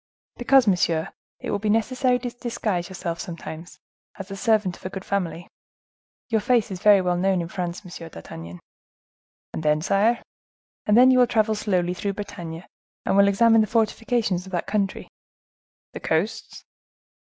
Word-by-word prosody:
"Because, 260 +1 +4
monsieur, 175 -5 +1 0.3
it - - -4
will 205 - 0
be 210 +1 -1
necessary 250 +4 +2
to 245 -1 -5
disguise 220 -7 -3
yourself 175 -3 -4
sometimes, 165 -1 -8 0.4
as 195 0 -8
the 195 - -5
servant 210 -4 +1
of - - -18
a 185 - -4
good 190 0 -7
family. 180 -3 -2 0.8
Your 220 -2 +1
face 230 -1 +2
is 185 -1 -6
very 205 -2 +6
well 180 -1 0
known 190 +1 +1
in 170 - -3
France, 175 +1 -5
M. 170 -2 -9
d'Artagnan." 85 - -10 0.9
"And - - -4
then, 150 -1 +2
sire?" 215 +6 +2 0.6
"And 210 +1 +5
then 255 +1 +8
you 255 - +4
will 245 - +5
travel 220 -2 +2
slowly 185 -4 0
through 200 +2 -3
Bretagne, 170 -4 -7 0.4
and - - +1
will 200 0 +6
examine 225 +3 +5
the 215 - +1
fortifications 220 -4 0
of - - -11
that 175 - -1
country." 200 -3 -2 0.9
"The - - -6
coasts?" 170 +8 -2
195 Hz, 165 wpm, -24 LUFS, 175-225 Hz, 0.9 s, then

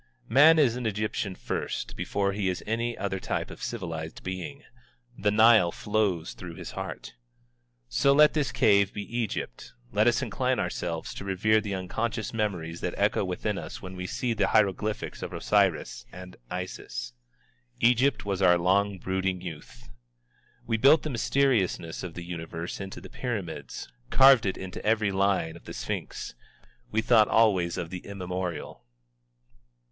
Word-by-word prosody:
Man 150 +7 +7
is 135 -7 +4
an 125 -2 -2
Egyptian 105 -2 -2
first, - - -4
before 100 -1 -1
he 100 -1 0
is 90 - -3
any 115 +2 -1
other 95 -1 -2
type - - -3
of - - -11
civilized 80 -3 -5
being. 95 +11 -5 0.5
The 105 -1 +1
Nile 110 -4 +6
flows 100 -6 -1
through 85 -2 -9
his - - -7
heart. - - -6 0.7
So 140 - +3
let 150 +2 +6
this 150 -3 0
cave 100 -1 +4
be 105 - -4
Egypt, 105 - -3 0.2
let - - +3
us - - +3
incline - - 0
ourselves 85 -2 -3
to - - -7
revere 105 +3 +2
the 100 -2 -3
unconscious 110 +5 -3
memories 90 -7 -2
that - - -2
echo - - +2
within 95 +3 -2
us - - -8
when 95 0 -7
we 90 0 -5
see 120 +5 -1
the 105 -3 +1
hieroglyphics 105 0 0
of - - -5
Osiris, 95 -7 +1
and 90 +1 -10
Isis. - - -5 0.7
Egypt 125 +2 +3
was 100 -2 -2
our 90 -2 +6
long 95 +3 +2
brooding 95 0 -1
youth. 75 -8 -10 0.7
We 115 -1 0
built 140 +7 +6
the 155 - -3
mysteriousness 115 -9 +1
of 90 -3 -7
the 85 - -6
Universe 85 -1 -5
into 95 0 -7
the - - -11
Pyramids, 100 - -5 0.2
carved 135 -5 +7
it 95 - -1
into 95 -1 -7
every 105 -2 +2
line 95 -4 +1
of 85 - -14
the - - -7
Sphinx. - - -5 0.6
We 110 +1 0
thought 110 -3 +5
always 95 -7 +3
of 85 - -4
the 90 - -4
immemorial. 90 -3 -5
100 Hz, 155 wpm, -27 LUFS, 90-110 Hz, 0.7 s, Man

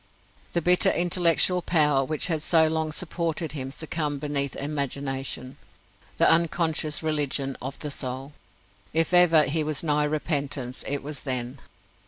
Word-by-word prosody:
The 170 - 0
bitter 180 +1 +5
intellectual 175 0 +3
power 150 -6 +2
which 155 +2 -1
had 160 -3 0
so 160 0 +3
long 160 0 -2
supported 165 -2 -3
him 135 -3 -5
succumbed 150 -1 -3
beneath 140 -2 -1
imagination 140 -2 -3 0.6
the - - +5
unconscious 165 -2 +1
religion 145 -3 -1
of 135 +2 -6
the 150 - -5
soul. 135 +1 -4 0.6
If 165 +2 +1
ever 170 -3 +6
he 155 +3 -1
was 150 -1 -3
nigh 150 -2 +1
repentance 145 -4 -3
it 140 0 -2
was 145 -1 -6
then. 130 0 -4
150 Hz, 140 wpm, -25 LUFS, 140-160 Hz, 0.6 s, ever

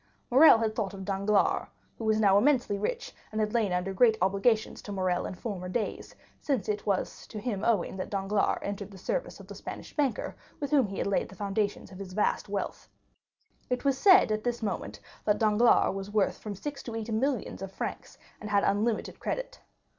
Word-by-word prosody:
Morrel 270 0 +8
had 220 -1 -1
thought 195 -2 -2
of 190 -1 -7
Danglars, 200 +1 +1 0.3
who 225 - -4
was 220 0 +3
now 200 -3 +5
immensely 240 -3 +3
rich, - - -3 0.2
and 215 - -3
had 210 -1 0
lain 220 -5 +2
under 180 +2 -1
great 220 +2 +4
obligations 200 +4 +1
to 205 - -8
Morrel 185 -2 0
in - - -6
former 185 -2 -5
days, 215 +2 -3 0.2
since 260 -10 -1
to - - +1
him 205 - -5
it - - -21
was 195 -2 -1 0.4
owing 200 -4 +1
that 185 - -4
Danglars 200 +1 +1
entered 200 0 -4
the 195 - -12
service - - -3
of - - -11
the - - -9
Spanish - - -8
banker, 275 -7 -1 0.2
with 285 0 -3
whom 275 -7 +4
he 195 - -7
had - - -1
laid 200 - 0
the 195 - -12
foundations 205 0 -2
of 185 - -11
his 190 -2 -7
vast 210 0 0
wealth. 200 -1 -4 0.8
It 250 +2 -2
was 275 -1 +3
said 375 - +6
at 215 0 -1
this 240 -1 -2
moment 135 - -3 0.2
that 210 - +2
Danglars 220 0 +4
was 195 0 -5
worth 205 -2 +1
from 210 -2 -6
six 280 +7 -6
to 230 - -7
eight 225 0 -4
millions 245 -2 -1
of 195 -1 -5
francs, - - -6 0.2
and 210 - -7
had 200 -1 +3
unlimited 215 +2 0
credit. - - -4
210 Hz, 205 wpm, -29 LUFS, 195-235 Hz, 0.8 s, Morrel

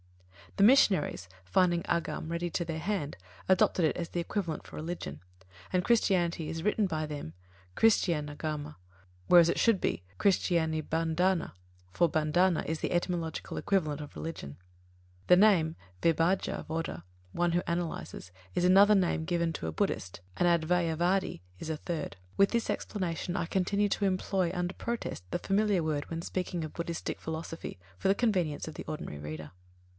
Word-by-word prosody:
The 195 - +4
missionaries, 190 - +4 0.2
finding 175 - +2
Āgama 170 -1 -2
ready 170 +1 -2
to 170 +1 -2
their 160 -1 -3
hand, 175 -4 -2 0.3
adopted 185 -2 +4
it 155 - +1
as 170 -1 -4
the 175 - -3
equivalent 170 -2 -3
for - - -11
"religion"; 155 - -5 0.5
and 180 -1 +2
Christianity 180 -8 +2
is 165 - -4
written 210 0 +2
by 155 -3 -2
them 145 - -6 0.4
Christianāgama, 150 -7 +1 0.5
whereas 170 -2 +8
it - - +1
should 230 -5 +4
be 90 - -1 0.2
Christianibandhana, 165 -1 +1 0.4
for 170 - +3
bandhana 160 +3 +2
is 160 0 -2
the - - -1
etymological 175 -2 -2
equivalent 155 -7 0
for 145 - -9
"religion". 75 - -6 0.7
The 180 - +7
name 180 -6 +4 0.2
Vibhajja 165 +3 +1
vāda 160 - -4 0.3
one 175 - +1
who 175 - +2
analyses 170 - -4 0.2
is 175 - +1
another 200 +3 +7
name 180 -4 +1
given 170 -1 0
to 80 - -4
a - - -2
Buddhist, 90 +3 -2 0.2
and 175 - +2
Advayavādī 170 - +1 0.2
is 160 - -6
a 160 - -2
third. 160 - -4 0.2
With 195 - +5
this 235 -1 -1
explanation, 180 -3 -2
I 175 - 0
continue 200 +4 +1
to 200 - 0
employ 185 -2 0
under 180 0 -2
protest 235 - -4
the - - -2
familiar 200 -1 +1
word 150 -2 -2
when 165 0 -4
speaking 180 -3 -3
of 155 - -9
Buddhistic 170 -1 -4
philosophy, 160 - -6 0.2
for 145 - 0
the 195 - +4
convenience 180 -12 0
of 155 - -6
the - - -7
ordinary 115 - -5
reader. 75 0 -7
170 Hz, 155 wpm, -30 LUFS, 155-185 Hz, 0.7 s, whereas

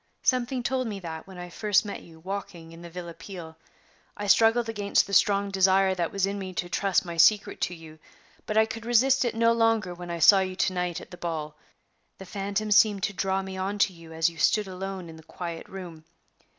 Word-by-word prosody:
Something 250 0 +1
told 255 -1 -1
me 205 -3 -5
that 160 -1 -7
when 190 -2 -11
I 180 0 -7
first 210 +3 +2
met 205 - -6
you 160 -1 -16
walking 175 -2 -6
in 165 0 -12
the 170 - -9
Villa 170 0 -7
Peale. 165 -1 -10 0.6
I 205 - -4
struggled 225 +3 +4
against 205 -3 +1
the 200 - -9
strong 200 0 +3
desire 190 0 +4
that 175 -3 -2
was 195 -1 +1
in 200 +1 -3
me 185 -1 -6
to 175 - -2
trust 195 0 +1
my 170 -1 -6
secret 205 +5 +4
to 175 - -1
you, 160 -1 -13 0.5
but 215 - -1
I 220 - +6
could 225 +1 -7
resist 255 +3 +3
it 235 - -1
no 230 0 +4
longer 225 -5 +1
when 175 0 -9
I 170 - -3
saw 195 +4 +7
you 185 -1 -2
to 185 - 0
night 180 -2 -2
at - - -13
the 180 - -9
ball; 155 -3 -4 0.6
the 190 - -10
phantom 200 +2 -3
seemed 205 -2 +4
to 200 - 0
draw 195 0 -1
me 190 0 -7
on 195 +2 -2
to 200 -1 +2
you 165 -1 -14
as 160 0 +1
you 165 -1 -5
stood 210 +3 +2
alone 190 -1 -6
in 160 -1 -11
the - - -13
quiet 170 0 -7
room. 175 -4 -9
190 Hz, 230 wpm, -27 LUFS, 170-210 Hz, 0.6 s, saw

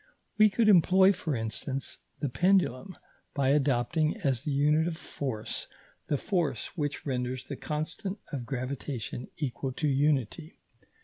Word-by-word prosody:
We 215 0 +8
could 220 +2 +2
employ, 190 0 +6
for 160 -5 -2
instance, 120 +4 -3 0.2
the 145 - +1
pendulum 180 +1 +1 0.4
by 135 -2 +2
adopting, 145 - +2
as 130 -5 +1
the 150 +1 -3
unit 150 +3 +3
of 165 -2 -3
force, 130 -10 -4 0.4
the 145 - +1
force 155 - -1
which 145 -3 -3
renders 125 -2 -2
the 140 - -5
constant 155 +8 -4
of 125 -5 -4
gravitation 130 -2 -4
equal 135 -2 -3
to 150 - -1
unity. 145 +2 0
145 Hz, 135 wpm, -29 LUFS, 130-165 Hz, 0.4 s, We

